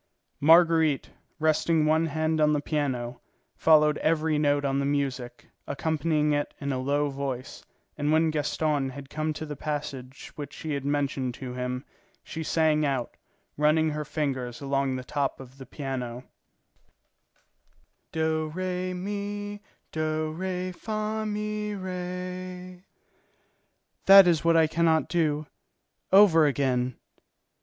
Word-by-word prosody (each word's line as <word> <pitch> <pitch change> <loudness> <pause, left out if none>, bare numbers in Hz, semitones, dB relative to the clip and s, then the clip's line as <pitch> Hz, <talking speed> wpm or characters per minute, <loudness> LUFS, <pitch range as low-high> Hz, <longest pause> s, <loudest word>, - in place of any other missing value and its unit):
Marguerite, 160 -2 +4 0.3
resting 155 0 +2
one 160 +1 +3
hand 155 +1 0
on 150 0 +4
the 150 - +2
piano, 130 -5 -2 0.3
followed 150 -1 +4
every 155 -1 +1
note 145 -1 +2
on 135 0 +1
the - - 0
music, 135 -4 -2 0.2
accompanying 155 0 0
it 145 0 -2
in 140 0 -2
a 130 - -1
low 145 +2 0
voice, 135 -1 -5 0.4
and 145 +1 +1
when 160 0 +3
Gaston 150 -2 0
had 135 +1 -10
come 155 0 -1
to 155 - -6
the 150 -1 -6
passage 140 -3 -5
which 145 -1 -7
she 155 -2 -4
had 140 -1 -3
mentioned 140 -3 -1
to 125 -1 -7
him, 125 +1 -4 0.4
she 160 - -6
sang 155 -1 +2
out, 135 -4 -1 0.4
running 155 +1 +3
her 150 0 -3
fingers 130 -5 -3
along 135 -1 0
the 130 - -5
top 140 +1 -2
of 135 +1 -12
the 135 - -10
piano: 125 -3 -5 1.9
"Do, 160 0 0
re, 185 0 -2
mi, 205 +2 -4 0.3
do, 155 0 -1
re, 185 +2 -3
fa, 215 +2 -3
mi, 210 0 -3
re; 180 -1 -6 1.3
that 195 0 +10
is 165 -3 +2
what 165 0 +4
I 160 - +6
can 165 +2 -1
not 160 -1 +3
do. 155 -3 +1 0.7
Over 185 -6 +7
again." 130 -3 0
155 Hz, 135 wpm, -27 LUFS, 140-165 Hz, 1.9 s, that